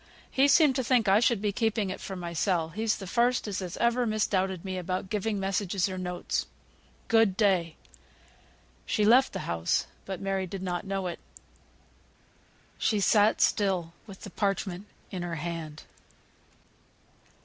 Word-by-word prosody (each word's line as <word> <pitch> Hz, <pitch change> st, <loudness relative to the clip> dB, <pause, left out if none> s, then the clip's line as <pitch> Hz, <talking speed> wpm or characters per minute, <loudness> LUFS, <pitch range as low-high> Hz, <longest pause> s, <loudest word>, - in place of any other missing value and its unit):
He 270 Hz, +1 st, +4 dB
seemed 285 Hz, -2 st, +5 dB
to 260 Hz, -, 0 dB
think 240 Hz, -3 st, +2 dB
I 195 Hz, +2 st, +5 dB
should 235 Hz, -3 st, +2 dB
be 205 Hz, -, +1 dB
keeping 215 Hz, -2 st, 0 dB
it -, -, -7 dB
for 195 Hz, -, -6 dB
mysel; 170 Hz, -1 st, -1 dB
he's 215 Hz, +5 st, -1 dB
th' 195 Hz, -, -8 dB
first 240 Hz, +3 st, +1 dB
as 205 Hz, -1 st, -3 dB
has 180 Hz, -2 st, -5 dB
ever 235 Hz, +1 st, +2 dB
misdoubted 190 Hz, -4 st, 0 dB
me 185 Hz, -1 st, -3 dB
about 185 Hz, +1 st, -4 dB
giving 210 Hz, 0 st, -1 dB
messages, 195 Hz, -1 st, 0 dB
or 185 Hz, -1 st, -5 dB
notes. 180 Hz, -1 st, -3 dB, 0.6 s
Good 225 Hz, -4 st, +3 dB
day." 185 Hz, -6 st, +2 dB, 1.1 s
She 210 Hz, -, +1 dB
left 250 Hz, +5 st, +5 dB
the 190 Hz, -, -5 dB
house, 85 Hz, 0 st, 0 dB, 0.2 s
but 190 Hz, -2 st, -4 dB
Mary 195 Hz, -1 st, -2 dB
did 190 Hz, +1 st, -6 dB
not 180 Hz, 0 st, -3 dB
know 195 Hz, -1 st, -2 dB
it. 175 Hz, -, -4 dB, 1.6 s
She 215 Hz, -, +1 dB
sat 210 Hz, +2 st, +4 dB
still 185 Hz, -5 st, +1 dB
with 195 Hz, -2 st, -11 dB
the 200 Hz, -, -9 dB
parchment 195 Hz, -1 st, -2 dB, 0.2 s
in 185 Hz, -3 st, -4 dB
her 175 Hz, -1 st, -3 dB
hand. 160 Hz, -2 st, -5 dB
195 Hz, 155 wpm, -28 LUFS, 180-215 Hz, 1.6 s, seemed